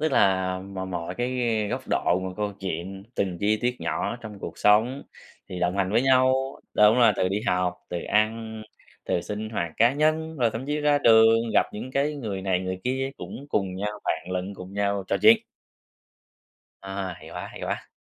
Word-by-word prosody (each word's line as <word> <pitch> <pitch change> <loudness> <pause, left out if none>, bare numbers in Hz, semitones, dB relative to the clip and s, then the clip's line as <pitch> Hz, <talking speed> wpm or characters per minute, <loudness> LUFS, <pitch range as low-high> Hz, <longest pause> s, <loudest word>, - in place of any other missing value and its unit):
tức 155 -2 0
là 95 -3 +3
mọi 95 0 -6
mọi 90 -1 -4
cái 120 +3 -2 0.4
góc - - -2
độ, 90 +2 +2
mọi 95 -1 -5
câu 105 -1 -2
chuyện, 95 +1 -4
từng 90 -3 -1
chi 105 +1 +3
tiết 125 0 -1
nhỏ - - -1
ở - - -4
trong 110 -3 -9
cuộc - - -7
sống 110 +6 +3 0.5
thì 90 - -6
đồng 90 +2 0
hành 95 -1 +1
với 115 - +4
nhau, 130 -1 +5 0.4
đúng 105 +3 +6
rồi, 115 -3 +6
từ 90 - +1
đi 100 +3 -1
học, 90 -2 +1
từ 85 -1 -4
ăn, 110 +1 0 0.4
từ 85 - 0
sinh 105 +3 -5
hoạt 85 -7 -2
cá 115 +3 +5
nhân, 155 +2 0
rồi 120 -3 +2
thậm 115 +4 -5
chí 150 +1 -1
ra 145 -1 +3
đường, 115 -1 +5
gặp - - +4
những 115 +5 -6
cái 140 +3 0
người 105 -8 -4
này 95 -1 +1
người 95 0 -4
kia 130 +1 -1
cũng 140 - -8
cùng 95 -6 -1
nhau, 105 +2 -2
vạn 90 - -2
lần 95 +2 -3
cùng 95 0 -10
nhau 100 -1 -1
trò - - +2
chuyện. 225 +1 +7 1.4
À, 95 -1 -4
hay - - -13
quá, - - -6
hay - - -10
quá. - - -4
105 Hz, 205 wpm, -25 LUFS, 95-125 Hz, 1.4 s, chuyện